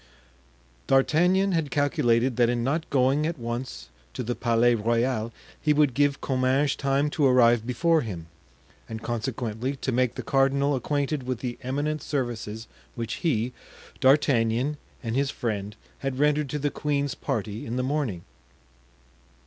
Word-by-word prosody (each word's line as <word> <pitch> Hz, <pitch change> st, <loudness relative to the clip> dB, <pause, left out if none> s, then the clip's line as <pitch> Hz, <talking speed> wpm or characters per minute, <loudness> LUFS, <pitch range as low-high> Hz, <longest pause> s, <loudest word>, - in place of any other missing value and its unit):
D'Artagnan 175 Hz, +8 st, +3 dB
had 165 Hz, -5 st, 0 dB
calculated 125 Hz, -4 st, +2 dB
that 120 Hz, -1 st, +4 dB
in 120 Hz, -1 st, 0 dB
not 155 Hz, +6 st, -1 dB
going 140 Hz, +3 st, +2 dB
at 170 Hz, 0 st, -3 dB
once 120 Hz, -, -5 dB, 0.3 s
to 125 Hz, -, -3 dB
the 120 Hz, +1 st, -2 dB
Palais 120 Hz, 0 st, +2 dB
Royal 115 Hz, +1 st, 0 dB, 0.3 s
he 150 Hz, -, +3 dB
would 145 Hz, -3 st, +3 dB
give 145 Hz, +1 st, +1 dB
Comminges 135 Hz, +2 st, +1 dB
time 140 Hz, +1 st, 0 dB
to 150 Hz, -, -1 dB
arrive 120 Hz, -3 st, +4 dB
before 165 Hz, +5 st, +2 dB
him, 90 Hz, -, -6 dB, 0.6 s
and 110 Hz, 0 st, -6 dB
consequently 120 Hz, +1 st, -3 dB
to 130 Hz, -, -3 dB
make 125 Hz, 0 st, +1 dB
the -, -, -5 dB
cardinal 140 Hz, +1 st, +2 dB
acquainted 145 Hz, +2 st, -1 dB
with 130 Hz, -1 st, -3 dB
the 125 Hz, -2 st, -4 dB
eminent 145 Hz, +4 st, -2 dB
services 115 Hz, -6 st, -3 dB, 0.3 s
which 115 Hz, -1 st, -4 dB
he, 125 Hz, -7 st, 0 dB, 0.5 s
D'Artagnan, 130 Hz, 0 st, +3 dB, 0.3 s
and 115 Hz, -1 st, -2 dB
his 140 Hz, +1 st, +1 dB
friend 105 Hz, -5 st, -3 dB, 0.2 s
had 135 Hz, -2 st, -3 dB
rendered 150 Hz, 0 st, +2 dB
to 150 Hz, -, -2 dB
the 145 Hz, 0 st, -1 dB
queen's 145 Hz, -2 st, -1 dB
party 105 Hz, +1 st, -3 dB
in 115 Hz, -, -3 dB
the 125 Hz, -, 0 dB
morning. 130 Hz, -, -2 dB
130 Hz, 150 wpm, -26 LUFS, 115-145 Hz, 0.6 s, that